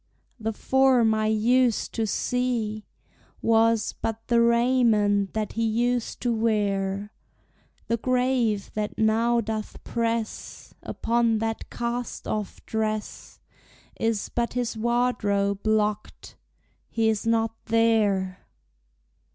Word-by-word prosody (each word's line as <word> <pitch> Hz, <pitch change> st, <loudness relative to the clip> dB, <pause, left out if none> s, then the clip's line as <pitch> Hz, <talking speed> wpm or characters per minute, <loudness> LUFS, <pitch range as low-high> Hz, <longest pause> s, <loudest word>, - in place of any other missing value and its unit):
The 225 Hz, 0 st, -2 dB
form 255 Hz, -1 st, +3 dB
I 215 Hz, 0 st, 0 dB
used 235 Hz, +2 st, +2 dB
to 225 Hz, -1 st, -1 dB
see 230 Hz, -3 st, -1 dB, 0.5 s
Was 225 Hz, 0 st, +2 dB
but 225 Hz, 0 st, -5 dB
the 235 Hz, -1 st, +4 dB
raiment 235 Hz, -4 st, +3 dB
that 215 Hz, -2 st, -2 dB
he 230 Hz, -, -1 dB
used 235 Hz, +2 st, 0 dB
to 245 Hz, -1 st, +1 dB
wear. 205 Hz, -2 st, -1 dB, 0.7 s
The 230 Hz, -, 0 dB
grave, 250 Hz, -4 st, 0 dB
that 210 Hz, -1 st, -3 dB
now 230 Hz, +2 st, +2 dB
doth 215 Hz, -1 st, -5 dB
press 230 Hz, -1 st, -3 dB
Upon 230 Hz, -1 st, 0 dB
that 225 Hz, 0 st, -3 dB
cast 240 Hz, 0 st, -4 dB
off 210 Hz, -2 st, -4 dB
dress, 215 Hz, -1 st, -4 dB, 0.6 s
Is 225 Hz, -2 st, -1 dB
but 235 Hz, 0 st, -2 dB
his 245 Hz, -1 st, -2 dB
wardrobe 215 Hz, -4 st, 0 dB
locked 210 Hz, -1 st, -1 dB, 0.5 s
he 225 Hz, -1 st, +1 dB
is 220 Hz, 0 st, 0 dB
not 225 Hz, -1 st, +1 dB
there! 215 Hz, -5 st, +2 dB
225 Hz, 110 wpm, -25 LUFS, 215-235 Hz, 0.7 s, the